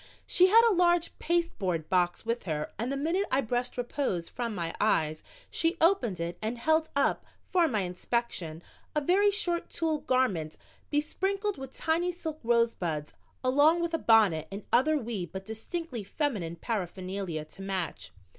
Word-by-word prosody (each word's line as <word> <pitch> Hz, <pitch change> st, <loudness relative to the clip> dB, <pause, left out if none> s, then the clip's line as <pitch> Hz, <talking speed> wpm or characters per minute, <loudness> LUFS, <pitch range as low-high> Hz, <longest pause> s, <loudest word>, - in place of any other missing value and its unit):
She 365 Hz, 0 st, +5 dB
had 455 Hz, +4 st, +7 dB
a 450 Hz, -, +4 dB
large 345 Hz, -1 st, +3 dB
pasteboard 215 Hz, -, 0 dB
box 180 Hz, +2 st, +1 dB
with 230 Hz, +1 st, -2 dB
her 150 Hz, -3 st, -3 dB
and 240 Hz, +4 st, -1 dB
the 275 Hz, -, -1 dB
minute 335 Hz, +8 st, 0 dB
I 265 Hz, -, +2 dB
brushed 245 Hz, +1 st, -2 dB
repose 240 Hz, -8 st, -2 dB
from 235 Hz, -3 st, -4 dB
my 170 Hz, -3 st, -2 dB
eyes 155 Hz, -7 st, +2 dB, 0.3 s
she 330 Hz, +1 st, +1 dB
opened 265 Hz, -, +2 dB
it 170 Hz, +1 st, -4 dB
and 220 Hz, +3 st, -2 dB
held 315 Hz, +5 st, +2 dB
up 280 Hz, -, +2 dB, 0.3 s
for 355 Hz, -3 st, +4 dB
my 220 Hz, -8 st, 0 dB
inspection 180 Hz, -3 st, -3 dB, 0.3 s
a 300 Hz, -, +2 dB
very 385 Hz, +7 st, +4 dB
short 365 Hz, -4 st, 0 dB
tulle 320 Hz, -2 st, -1 dB
garment 195 Hz, -, 0 dB, 0.3 s
besprinkled 385 Hz, +6 st, -1 dB
with 265 Hz, -1 st, -7 dB
tiny 335 Hz, +5 st, 0 dB
silk 320 Hz, -3 st, -6 dB
rosebuds, 225 Hz, -10 st, 0 dB, 0.3 s
along 290 Hz, +6 st, +4 dB
with 335 Hz, 0 st, -2 dB
a 325 Hz, -, +1 dB
bonnet 210 Hz, -, +4 dB
and 200 Hz, +1 st, -6 dB
other 305 Hz, +5 st, +4 dB
wee 225 Hz, -9 st, -3 dB
but 190 Hz, +4 st, -8 dB
distinctly 235 Hz, -, -4 dB
feminine 200 Hz, -, -2 dB
paraphernalia 185 Hz, -5 st, -4 dB
to 190 Hz, -, -13 dB
match. 180 Hz, -, -3 dB
240 Hz, 160 wpm, -29 LUFS, -, 0.3 s, had